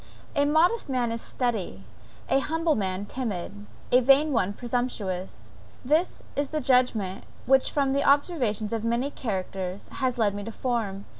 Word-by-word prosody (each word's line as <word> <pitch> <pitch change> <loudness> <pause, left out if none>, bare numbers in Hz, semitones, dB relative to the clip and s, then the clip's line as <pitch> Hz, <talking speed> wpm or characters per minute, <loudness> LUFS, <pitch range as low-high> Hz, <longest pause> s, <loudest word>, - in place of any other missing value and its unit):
A 285 -1 +3
modest 320 +6 +3
man 245 -3 0
is 230 0 -3
steady, 210 - -3 0.4
an 270 - +3
humble 325 +3 +1
man 190 -4 -2
timid, 210 -7 -4
and 205 0 -12 0.2
a 250 - +6
vain 275 +4 +5
one 200 -5 +1
presumptuous; 215 -5 -4 0.3
this 310 +7 +1
is 285 0 0
the 310 +2 -2
judgment, 250 -8 +1 0.2
which 265 0 +4
the 280 -1 +1
observation 255 - +1
of 225 -1 -2
many 235 +5 0
characters, 190 -5 -4
has 255 -2 -2
led 210 -4 +2
me 205 0 -5
to 225 - -6
form. 220 -5 -2
245 Hz, 155 wpm, -26 LUFS, 205-275 Hz, 0.4 s, a